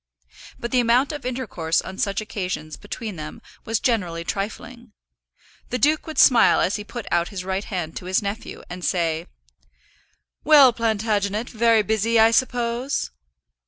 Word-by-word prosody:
But 235 - -5
the 255 - +3
amount 245 +5 +3
of 290 -4 -5
intercourse 210 -11 -1
on 190 0 -7
such 200 -2 0
occasions 180 -7 -5
between 205 -1 -7
them 155 0 -7 0.3
was 225 0 0
generally 180 -9 -1
trifling. 220 +5 -6 0.8
The 250 - -1
duke 300 +7 +2
would 315 -2 -7
smile 245 -3 +6
as 200 - +1
he 210 - -6
put 235 +1 -7
out 170 0 +2
his 195 -4 -6
right 190 +1 -2
hand 175 -6 -4
to - - -8
his 185 +1 +1
nephew, 205 +2 -6
and 180 0 -8
say, 165 -4 -1 1.2
"Well, 285 -5 +7
Plantagenet, 220 -1 -1
very 230 -1 +3
busy, 220 +2 +1
I 225 +1 +6
suppose?" 245 - 0
220 Hz, 155 wpm, -23 LUFS, 190-240 Hz, 1.2 s, Well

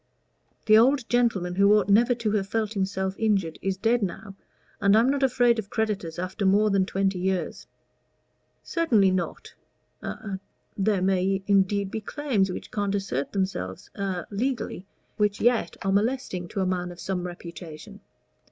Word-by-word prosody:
"The 215 0 +7
old 255 +1 +3
gentleman, 225 -8 +1
who 200 +3 +5
ought 200 -3 +1
never 235 +5 +4
to 230 -3 -1
have 200 -2 0
felt 220 0 -1
himself 190 -1 -1
injured, 195 -7 0
is 195 0 -1
dead 230 +4 +2
now, 195 +1 -4 0.5
and 200 +1 +5
I'm 240 +4 +4
not 280 0 -1
afraid 245 -3 +3
of 200 -2 -6
creditors 205 -8 -2
after 185 +4 -4
more 205 +2 +4
than 195 -1 +2
twenty 195 -1 0
years." 190 0 -2 1.0
"Certainly 230 - +3
not; 185 -2 -3 0.5
a 195 -3 -5 0.4
there 195 -1 +1
may 190 0 +1
indeed 200 0 +2
be 220 - -3
claims 215 -7 0
which - - -7
can't 205 -1 -1
assert 145 -9 -2
themselves 185 - -3
a 190 -3 -3
legally, 215 -4 -3 0.3
which 210 -1 +1
yet 240 0 +1
are 195 - +2
molesting 205 -4 0
to 195 +2 -3
a - - +1
man 180 -1 -2
of 175 - -12
some 180 -1 -3
reputation. 170 +2 -9
200 Hz, 160 wpm, -26 LUFS, 185-220 Hz, 1.0 s, The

